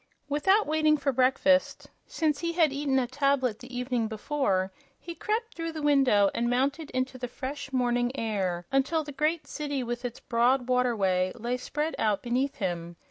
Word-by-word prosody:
Without 380 +9 +3
waiting 310 0 +3
for 280 -1 0
breakfast, 270 +2 +2 0.2
since 305 -3 0
he 335 0 -2
had 325 -5 +3
eaten 280 -1 0
a 260 - +2
tablet 260 -3 0
the 250 +1 -12
evening 245 -2 -1
before, 215 -4 -1 0.3
he 340 - -7
crept 445 +5 -2
through 330 0 -4
the 310 -2 -5
window 265 -9 +4
and 235 0 0
mounted 280 +5 0
into 255 0 -2
the 245 - -3
fresh 275 +3 -6
morning 245 -1 +1
air 190 -6 -2
until 285 +4 +1
the 290 - -8
great 305 +3 0
city 285 -3 -3
with 240 +1 -4
its 245 -1 -5
broad 245 +2 +2
waterway 205 -8 +1
lay 240 +1 -2
spread 295 +5 -3
out 210 -3 +1
beneath 255 +3 0
him. 175 -3 -3
260 Hz, 175 wpm, -28 LUFS, 240-295 Hz, 0.3 s, window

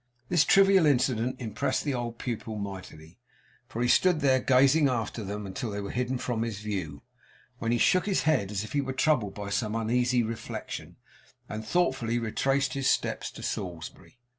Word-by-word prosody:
This 170 -4 +4
trivial 195 -3 +5
incident 125 -2 +1
impressed 110 -4 -1
the 145 - -1
old 120 -2 -4
pupil 115 -3 -4
mightily, 95 -4 -8 0.5
for 120 0 -3
he - - +2
stood 180 +5 +4
there, 135 -3 +3
gazing 135 +4 +4
after 115 -2 -2
them, 105 +1 -5
until 105 +5 -4
they 100 0 -4
were 100 -1 -5
hidden 125 +1 -1
from 120 -2 -2
his 115 -3 -2
view; 95 -9 -5 0.6
when 115 - -1
he 120 - +2
shook 185 - +3
his 195 - +1
head, 150 -11 +2
as 105 0 -2
if 110 - -9
he 145 - +2
were 135 -1 -4
troubled 125 -8 +1
by 100 -1 -6
some 105 +1 -1
uneasy 120 +2 +1
reflection, 115 0 -6 0.5
and 110 +1 -5
thoughtfully 130 -5 0
retraced 135 +4 0
his 135 -1 +1
steps - - 0
to - - -11
Salisbury. 85 +7 -6
120 Hz, 180 wpm, -28 LUFS, 105-135 Hz, 0.6 s, trivial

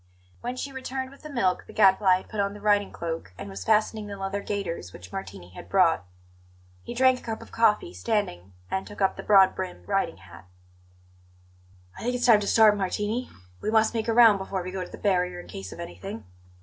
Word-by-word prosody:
When 245 +1 -4
she 275 +2 -5
returned 265 0 -5
with 275 - -16
the 305 - -9
milk 215 -10 0
the - - -12
Gadfly 190 -2 +5
had 185 - -11
put 215 - -5
on 200 0 0
the - - -9
riding 205 -1 +2
cloak 165 - -5
and 100 - -7
was 95 -1 -6
fastening 215 - +1
the 200 -1 -7
leather 195 +1 -3
gaiters 175 - -4
which 90 +1 -12
Martini 95 -2 -7
had 90 - -12
brought. 90 - +3 0.8
He 240 - -8
drank 260 0 +4
a - - -17
cup 225 -1 -5
of - - -13
coffee, 225 +10 +2
standing, 95 - -2 0.2
and 190 - -2
took 205 - -11
up 195 -1 +2
the - - -6
broad 195 -2 +6
brimmed 185 -1 -6
riding 195 -1 0
hat. 95 -1 -15 1.5
"I - - -10
think 245 +1 -1
it's 245 0 0
time 230 -4 +7
to 205 - -4
start, 215 -1 +6
Martini; 210 +5 -2 0.3
we - - -2
must 220 0 +3
make 225 -1 -2
a 230 - +2
round 225 -4 +7
before 190 -1 -3
we 185 - -5
go 185 -1 -3
to - - -9
the - - -10
barrier, 180 -3 0
in - - -10
case 95 -1 -8
of - - -10
anything. 95 +5 -7
200 Hz, 220 wpm, -26 LUFS, 180-225 Hz, 1.5 s, time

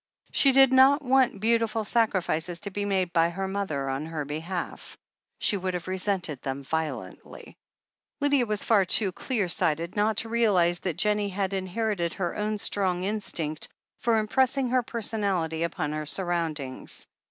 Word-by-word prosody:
She 275 - +5
did 270 0 +6
not 270 +3 +6
want 260 -5 +3
beautiful 225 0 +1
sacrifices 185 -7 0
to 200 -1 -5
be 205 +1 -2
made 190 -3 0
by 165 0 +4
her 190 +3 -3
mother 190 -9 -2
on 135 +3 -3
her 160 -3 -4
behalf. 165 +5 -5 0.4
She - - +1
would 185 -1 -2
have 175 0 -5
resented 185 -6 -1
them 135 +1 -4
violently, 160 +2 -5 0.6
Lydia 285 -4 +2
was 210 -1 -1
far 210 -4 +4
too 190 +2 +1
clear 215 0 -1
sighted 170 +2 0
not 210 0 +1
to 225 - -1
realize 190 -7 +3
that 175 -5 -3
Jennie 210 -1 +1
had 195 0 -2
inherited 190 -2 -1
her 175 -3 -2
own 210 0 -1
strong 185 -3 0
instinct 175 -7 -2 0.3
for 230 -1 +2
im 215 -1 0
pressing 265 +1 +1
her 255 0 +3
personality 200 -9 -2
upon 160 -3 -2
her 155 0 -3
surroimdings. 160 -7 -3
195 Hz, 160 wpm, -27 LUFS, 170-220 Hz, 0.6 s, did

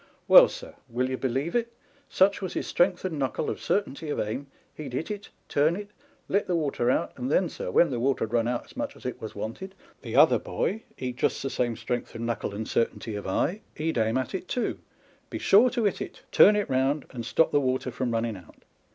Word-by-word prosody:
Well, - - +10
sir - - -8
^ - - -15 0.2
will 125 +2 -1
you - - 0
believe 135 - -1
it? 235 -1 +2
â€" - - -29 0.4
such 195 +2 +3
was 185 - -4
his - - -2
strength 180 +1 +1
of 185 - -1
knuckle 140 -4 -1
and - - -6
certainty 160 -6 -1
of - - -2
aim, 120 +7 -3 0.3
he'd 140 -5 -8
hit 160 +10 -3
it, 205 -1 -6 0.2
turn 150 +4 +2
it, 205 +1 -7 0.4
let 200 +2 +1
the 180 - +1
water 140 -6 0
out, - - +1
and 130 +2 -3
then, 180 +2 +3
sir, - - -5
when 170 -4 +4
the 120 - -2
water 135 0 +1
had 110 - -11
run 115 -1 +2
out 120 0 -2
as - - -18
much 285 +1 -4
as - - -16
it 125 - -4
was 110 - -7
wanted, 115 - -6 0.3
the - - -6
other - - +6
boy 225 - -2 0.2
(he'd 125 -1 -4
just - - 0
the 135 - -2
same 120 -2 -1
strength 120 -1 -4
of 115 - -5
knuckle 115 -3 -2
and 110 +1 -4
certainty 115 -1 -1
of 105 -1 -5
eye) 170 - 0
he'd 155 -4 -1
aim 110 +2 +1
at 130 - -2
it 185 -1 -4
too, 245 - -2 0.5
be - - -4
sure 220 +6 +5
to 240 -1 -1
hit 200 -3 0
it, - - -7
turn 210 - +7
it 205 -1 0
round, 135 +2 +1
and 120 -3 -5
stop 160 +7 +2
the 145 - +3
water 130 -1 -1
from 125 +1 -2
running 115 -1 -1
out. 90 -4 -15
135 Hz, 240 wpm, -27 LUFS, 120-190 Hz, 0.5 s, Well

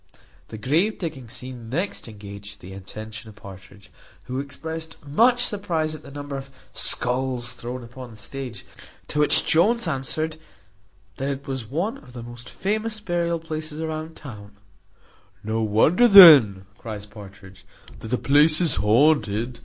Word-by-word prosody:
The 110 - -9
grave 160 - 0
digging 150 - -6
scene 125 -2 -9
next 175 - -3
engaged 100 -1 -10
the 95 +2 -11
attention 110 +3 -9
of 105 - -15
Partridge, 100 0 -14 0.3
who 130 +1 -5
expressed 160 +3 -7
much 240 - +3
surprize 165 -7 -2
at 155 - -9
the - - -13
number 145 0 -7
of 135 0 -9 0.2
skulls 125 0 +1
thrown 120 +1 -7
upon 120 +1 -11
the 110 - -14
stage. 120 0 -7 0.4
To 150 - -2
which 150 - +7
Jones 210 +6 +3
answered, 155 +3 -3 0.8
"That 135 +1 -3
it 140 0 -5
was 130 -4 -5
one 170 - -3
of 125 -3 -17
the 120 -2 -8
most 120 +1 -11
famous 215 +2 -3
burial 175 -4 -1
places 155 -1 -6
about 160 0 -5
town." 105 -7 -12 0.9
"No 110 +1 -2
wonder 115 - +3
then," 145 - +9
cries 105 -3 -7
Partridge, 100 -2 -14 0.4
"that - - -9
the 125 +3 -1
place 150 +4 +4
is 170 -3 +2
haunted. 115 0 +2
130 Hz, 150 wpm, -23 LUFS, 110-160 Hz, 0.9 s, then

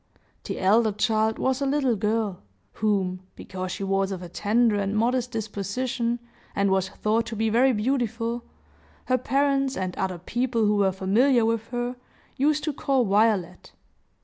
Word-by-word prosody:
The - - -4
elder 215 +3 +3
child 220 +1 +1
was 260 +1 0
a 275 - +1
little 270 -4 +1
girl, 210 -2 -1 0.4
whom, 195 -4 +1 0.2
because 185 -1 -6
she 195 - -4
was 195 0 0
of 185 -2 -5
a 175 - -8
tender 215 +4 +2
and 200 +1 -1
modest 245 +2 +1
disposition, 230 +2 -2 0.4
and 200 -1 +2
was 190 -1 +1
thought 225 +3 0
to 225 - -5
be 220 0 0
very 255 +4 +4
beautiful, 235 0 -1 0.6
her 255 0 +1
parents, 275 +1 +1
and 185 -1 -3
other 185 -2 -2
people 235 +5 -1
who 210 0 +2
were 195 -1 +3
familiar 225 +7 +3
with 225 0 -1
her, 245 0 -3 0.4
used 295 +2 +1
to 305 - -1
call 270 -2 +1
Violet. 205 -3 +1
225 Hz, 160 wpm, -25 LUFS, 200-250 Hz, 0.6 s, very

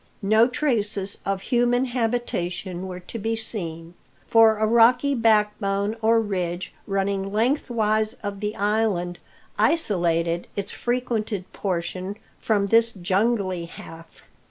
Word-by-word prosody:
No 220 +3 +5
traces 210 -7 -1
of 195 -1 -1
human 245 +2 +2
habitation 200 -7 -2
were 180 -1 -7
to 225 +6 -8
be 225 +2 -1
seen; 170 -7 -4 0.3
for 225 -1 +5
a 215 - +1
rocky 240 +5 +4
backbone 210 -3 +1
or 225 +1 +4
ridge, 185 -4 -3
running 195 0 -1
lengthwise 220 -2 +1
of 200 -1 -4
the 210 +1 -3
island, 205 -4 0 0.4
isolated 170 - +1
its 200 0 -3
frequented 230 -5 -2
portion 185 +1 -3 0.2
from 205 -3 +1
this 230 +3 +3
jungly 190 -1 0
half. 165 0 -12
210 Hz, 115 wpm, -24 LUFS, 185-225 Hz, 0.4 s, No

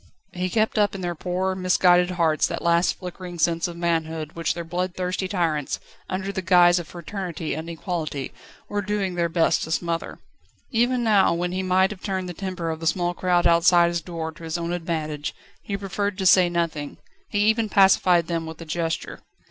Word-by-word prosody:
He 180 +1 -2
kept 215 +1 +1
up 205 -1 +2
in 195 - -5
their 175 -1 -2
poor, 185 +3 -2
misguided 180 -1 +3
hearts 160 -3 +2
that - - -5
last 170 +1 +3
flickering 180 -1 -8
sense 165 +1 +1
of 170 -1 -8
manhood 160 -2 -1
which 165 0 -2
their 170 - -4
bloodthirsty 180 +2 -2
tyrants, 165 -7 -1 0.3
under 190 +1 -2
the 190 -1 -3
guise 175 -1 +5
of 170 - -7
Fraternity 175 -2 -5
and 160 +2 -5
Equality, 160 -4 -4 0.3
were 205 0 -2
doing 200 -2 -2
their 170 -1 0
best 165 0 +2
to - - -4
smother. 165 0 -2 0.5
Even 245 +1 +2
now, 205 -6 +4
when 175 +1 -2
he 185 +1 -2
might 185 +1 +2
have 205 - -8
turned 190 -2 -3
the 180 - -5
temper 180 -2 -4
of 160 - -5
the 165 - -3
small 175 +1 +1
crowd 175 -1 +1
outside 170 0 +5
his 170 0 -2
door 165 -1 -5
to 165 +1 -15
his 165 +1 -3
own 170 0 -3
advantage, 155 -4 -3 0.3
he 200 - -4
preferred 200 0 -3
to 190 - -2
say 180 -1 +6
nothing; 165 -4 -2 0.3
he 205 - 0
even 220 0 +2
pacified 185 -4 +5
them 165 -1 -3
with 160 0 -8
a 165 - -8
gesture. 165 0 -3
175 Hz, 195 wpm, -24 LUFS, 165-190 Hz, 0.5 s, say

